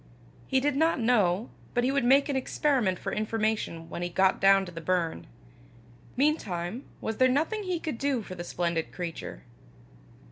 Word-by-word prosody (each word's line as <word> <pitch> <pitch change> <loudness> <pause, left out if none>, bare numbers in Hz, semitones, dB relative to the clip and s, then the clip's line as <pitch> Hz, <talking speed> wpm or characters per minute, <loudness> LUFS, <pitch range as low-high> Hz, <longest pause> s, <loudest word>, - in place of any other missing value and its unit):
He 265 - +2
did 285 +1 0
not 320 0 +2
know, 220 -3 +2 0.2
but 245 - +2
he 260 - +2
would 280 -1 +1
make 270 +4 +5
an 285 - -1
experiment 260 -7 +1
for - - -4
information 215 -6 -1
when 170 - -6
he 175 - -2
got 190 +2 +2
down 195 0 +5
to 180 - -9
the 165 -1 -7
burn. 170 -1 -1 0.9
Meantime 230 - -1 0.2
was 220 -1 -3
there 255 0 +5
nothing 325 - 0
he 360 -2 -1
could 310 -8 -4
do 275 -5 0
for 185 - -8
the 175 -1 -6
splendid 170 -2 -2
creature? 170 -3 -6
220 Hz, 175 wpm, -28 LUFS, 180-275 Hz, 0.9 s, make